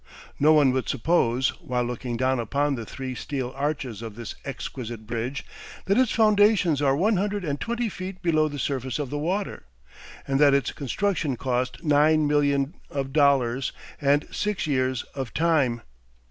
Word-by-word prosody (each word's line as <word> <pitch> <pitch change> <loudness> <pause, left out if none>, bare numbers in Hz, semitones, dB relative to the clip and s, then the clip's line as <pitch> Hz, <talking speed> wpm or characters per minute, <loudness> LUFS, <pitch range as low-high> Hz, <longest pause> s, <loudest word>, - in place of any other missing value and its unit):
No 150 +2 +5
one 150 -4 +5
would 130 0 -1
suppose, 130 -3 +2
while 125 -1 -1
looking 120 0 -4
down 130 +1 +1
upon 140 +5 0
the 115 -5 -5
three 130 -1 -5
steel 130 -1 -4
arches 135 -6 -3
of 110 -3 -7
this 115 -1 -6
exquisite 120 -5 -6
bridge, 120 +5 -4 0.4
that 195 - +2
its 255 0 +3
foundations 205 -8 +4
are 135 -2 +3
one 205 +7 +2
hundred 200 0 -1
and 145 -2 -3
twenty 235 0 -1
feet 185 -2 -6
below 155 -3 +3
the 145 -1 -6
surface 130 -2 -2
of 145 -4 -4
the 145 - -2
water, 185 - -3 0.6
and 135 0 +1
that 145 -2 +6
its 140 -4 0
construction 155 -1 -1
cost 125 +4 -2
nine 155 0 +4
millions 145 0 +2 0.2
of 135 -2 -4
dollars 135 -4 +2 0.3
and 145 +1 +3
six 210 -1 -1
years 130 -3 0
of 135 -4 -5
time. 145 -8 +2
140 Hz, 165 wpm, -25 LUFS, 130-155 Hz, 0.6 s, that